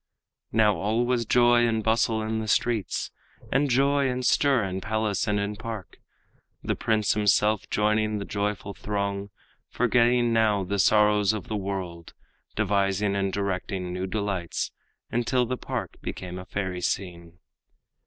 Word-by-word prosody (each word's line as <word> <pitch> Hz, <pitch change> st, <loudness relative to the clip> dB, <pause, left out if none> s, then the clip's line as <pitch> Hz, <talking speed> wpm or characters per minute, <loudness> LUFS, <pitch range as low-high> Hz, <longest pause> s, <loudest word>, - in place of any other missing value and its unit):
Now 105 Hz, -2 st, +3 dB
all 110 Hz, +4 st, 0 dB
was 120 Hz, -2 st, 0 dB
joy 120 Hz, 0 st, +5 dB
and 110 Hz, -1 st, 0 dB
bustle 110 Hz, 0 st, +1 dB
in 110 Hz, 0 st, -2 dB
the 110 Hz, -, -4 dB
streets, 110 Hz, -2 st, 0 dB, 0.4 s
And 140 Hz, +2 st, +2 dB
joy 140 Hz, +2 st, +3 dB
and 125 Hz, 0 st, -2 dB
stir 135 Hz, -4 st, +3 dB
in 95 Hz, -1 st, -3 dB
palace 110 Hz, -1 st, -1 dB
and 105 Hz, -1 st, +1 dB
in 100 Hz, +1 st, -3 dB
park, 110 Hz, -4 st, -7 dB, 0.7 s
The -, -, 0 dB
prince 110 Hz, -2 st, +1 dB
himself 105 Hz, 0 st, +2 dB
joining 105 Hz, 0 st, +1 dB
the 100 Hz, -, -4 dB
joyful 100 Hz, -1 st, -3 dB
throng, 100 Hz, -1 st, -3 dB, 0.4 s
Forgetting 120 Hz, 0 st, +2 dB
now 110 Hz, -3 st, +3 dB
the 100 Hz, +2 st, -2 dB
sorrows 105 Hz, +1 st, +4 dB
of 105 Hz, -4 st, -6 dB
the 110 Hz, -, -2 dB
world. 95 Hz, -4 st, -5 dB, 0.4 s
Devising 100 Hz, 0 st, +1 dB
and 100 Hz, -1 st, 0 dB
directing 95 Hz, -2 st, -3 dB
new 90 Hz, +1 st, -3 dB
delights 95 Hz, -3 st, -2 dB, 0.4 s
Until 120 Hz, +1 st, +1 dB
the 125 Hz, +2 st, -2 dB
park -, -, -5 dB
became 90 Hz, 0 st, -6 dB
a 90 Hz, -, -9 dB
fairy 95 Hz, -1 st, -3 dB
scene. 85 Hz, -2 st, -3 dB
105 Hz, 145 wpm, -26 LUFS, 100-115 Hz, 0.7 s, joy